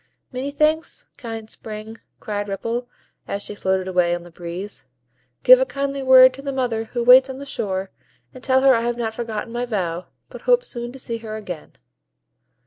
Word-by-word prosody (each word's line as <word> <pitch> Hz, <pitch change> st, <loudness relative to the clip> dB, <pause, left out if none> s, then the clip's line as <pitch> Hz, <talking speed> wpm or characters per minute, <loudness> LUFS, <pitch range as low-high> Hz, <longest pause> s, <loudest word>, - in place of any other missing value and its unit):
"Many 260 Hz, +2 st, -3 dB
thanks, 305 Hz, +3 st, 0 dB
kind 225 Hz, -4 st, -7 dB
Spring!" 220 Hz, 0 st, -8 dB, 0.2 s
cried 205 Hz, -1 st, -3 dB
Ripple, 230 Hz, +5 st, -3 dB, 0.4 s
as 200 Hz, 0 st, -3 dB
she -, -, -7 dB
floated 190 Hz, -2 st, -1 dB
away 180 Hz, -2 st, +2 dB
on 175 Hz, -, -7 dB
the 175 Hz, -, -14 dB
breeze; 175 Hz, +4 st, -7 dB, 0.6 s
"give -, -, +9 dB
a -, -, +4 dB
kindly 275 Hz, 0 st, -3 dB
word 260 Hz, -1 st, +8 dB
to 270 Hz, -, -9 dB
the 275 Hz, 0 st, -3 dB
mother 245 Hz, -4 st, -1 dB
who 240 Hz, +2 st, -3 dB
waits 255 Hz, +2 st, +8 dB
on 265 Hz, -, -6 dB
the 280 Hz, -, -8 dB
shore, 190 Hz, -7 st, -3 dB, 0.4 s
and 255 Hz, -, -12 dB
tell 260 Hz, 0 st, +3 dB
her 270 Hz, 0 st, +6 dB
I 230 Hz, -, +2 dB
have 240 Hz, 0 st, -1 dB
not 225 Hz, -2 st, -2 dB
forgotten 230 Hz, -1 st, -4 dB
my 245 Hz, +1 st, -2 dB
vow, 180 Hz, -6 st, -2 dB, 0.2 s
but -, -, -11 dB
hope -, -, +3 dB
soon 240 Hz, -, -5 dB
to -, -, -9 dB
see 230 Hz, -3 st, -4 dB
her 220 Hz, -1 st, -6 dB
again." 185 Hz, -7 st, -7 dB
230 Hz, 195 wpm, -22 LUFS, 205-260 Hz, 0.6 s, give